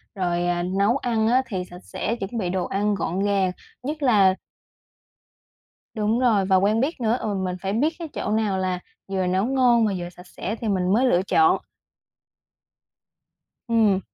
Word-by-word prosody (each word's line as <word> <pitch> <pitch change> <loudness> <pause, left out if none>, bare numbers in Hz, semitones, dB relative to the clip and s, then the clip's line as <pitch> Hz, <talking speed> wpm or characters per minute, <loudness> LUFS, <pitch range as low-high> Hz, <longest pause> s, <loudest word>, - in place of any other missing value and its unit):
rồi, 175 -2 -1
à, 175 0 0
nấu 200 +7 +1
ăn 230 -4 0
á, 250 +3 +4
thì 190 -6 -3
sạch 180 0 -13
sẽ, 230 - -3
chuẩn 230 +1 -5
bị 190 -5 -1
đồ 185 0 -1
ăn 205 +1 0
gọn 185 -1 -2
gàng, 200 -2 +1 0.3
nhất 300 +3 -4
là 200 -7 +5 1.6
Đúng 220 +1 0
rồi, 225 -6 +3
và 190 0 +3
quen 205 +4 +3
biết 275 +2 -1
nữa. 230 +1 +2
Ừ, 210 - -2
mình 185 -1 -2
phải 195 +1 -2
biết 290 +9 +1
cái 335 - -5
chỗ 205 - -3
nào 215 -3 +1
là 185 -1 -1 0.3
vừa 190 -1 -1
nấu 185 +3 +1
ngon 245 -3 +3
và 205 - -1
vừa 175 -1 -5
sạch 180 +1 -15
sẽ 210 +4 -5
thì 230 - -5
mình 185 -2 +1
mới 245 +5 +3
lựa 180 -8 +3
chọn. 160 -4 +3 2.1
Ừm. 220 -4 +3
200 Hz, 185 wpm, -23 LUFS, 185-230 Hz, 2.1 s, là